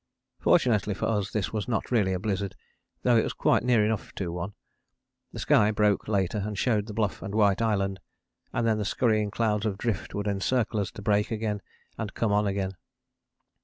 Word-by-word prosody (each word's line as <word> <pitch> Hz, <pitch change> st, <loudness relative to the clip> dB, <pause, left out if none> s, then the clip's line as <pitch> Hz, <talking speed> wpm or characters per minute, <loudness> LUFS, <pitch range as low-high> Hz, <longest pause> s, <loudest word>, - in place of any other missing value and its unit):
Fortunately 105 Hz, -4 st, +3 dB
for -, -, -2 dB
us 105 Hz, -3 st, 0 dB
this 105 Hz, -2 st, -2 dB
was 105 Hz, -2 st, -2 dB
not 120 Hz, 0 st, -2 dB
really 105 Hz, -6 st, +3 dB
a 95 Hz, -, 0 dB
blizzard, 100 Hz, 0 st, -2 dB, 0.5 s
though 120 Hz, -2 st, +4 dB
it 110 Hz, -, +4 dB
was -, -, -3 dB
quite -, -, +2 dB
near 120 Hz, -4 st, +4 dB
enough 110 Hz, 0 st, -2 dB
to 90 Hz, -4 st, -3 dB
one. 90 Hz, +4 st, -4 dB, 0.8 s
The -, -, -9 dB
sky 105 Hz, 0 st, +4 dB
broke 105 Hz, -1 st, +2 dB
later 100 Hz, -1 st, 0 dB
and 105 Hz, -1 st, -4 dB
showed 105 Hz, -2 st, +1 dB
the 110 Hz, -, -6 dB
Bluff 105 Hz, -4 st, -1 dB
and 100 Hz, +2 st, -5 dB
White 105 Hz, -1 st, +3 dB
Island, 100 Hz, -4 st, 0 dB, 0.5 s
and 120 Hz, -, 0 dB
then 110 Hz, -1 st, +2 dB
the -, -, 0 dB
scurrying 110 Hz, 0 st, +1 dB
clouds 105 Hz, -1 st, 0 dB
of 100 Hz, -2 st, -2 dB
drift 110 Hz, -5 st, -3 dB
would 105 Hz, 0 st, -2 dB
encircle 105 Hz, +3 st, 0 dB
us 100 Hz, -, -1 dB
to 105 Hz, -, -9 dB
break 105 Hz, 0 st, +2 dB
again 105 Hz, -2 st, -2 dB, 0.4 s
and 105 Hz, -2 st, -4 dB
come 115 Hz, -3 st, 0 dB
on 105 Hz, 0 st, +2 dB
again. 95 Hz, -1 st, -2 dB
105 Hz, 200 wpm, -27 LUFS, 100-110 Hz, 0.8 s, though